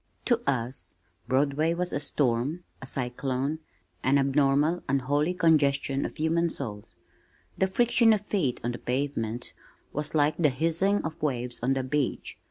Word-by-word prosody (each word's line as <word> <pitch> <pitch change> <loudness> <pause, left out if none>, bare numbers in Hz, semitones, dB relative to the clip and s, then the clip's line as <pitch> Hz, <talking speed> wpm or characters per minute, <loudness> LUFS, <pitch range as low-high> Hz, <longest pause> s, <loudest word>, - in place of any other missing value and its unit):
To 240 -2 +2
us 125 -1 -3 0.3
Broadway 145 +5 +1
was 180 +1 -1
a - - 0
storm, 145 +3 0 0.2
a 135 - -7
cyclone, 130 +3 -2 0.4
an 135 +2 +3
abnormal 140 +4 +2
unholy 145 +5 +1
congestion 140 -5 +2
of - - -6
human 165 +2 +1
souls. 105 -9 -5 0.6
The 190 - +2
friction 235 +3 +4
of 215 -2 +2
feet 155 - 0
on 120 - -1
the 120 - -6
pavement 125 -3 -2 0.4
was 150 +2 -1
like 150 0 +3
the 155 -4 +4
hissing 165 +9 +1
of 160 0 -6
waves 125 -4 -2
on 130 +3 +2
the 135 -1 -1
beach. 135 +1 -2
145 Hz, 150 wpm, -27 LUFS, 130-165 Hz, 0.6 s, friction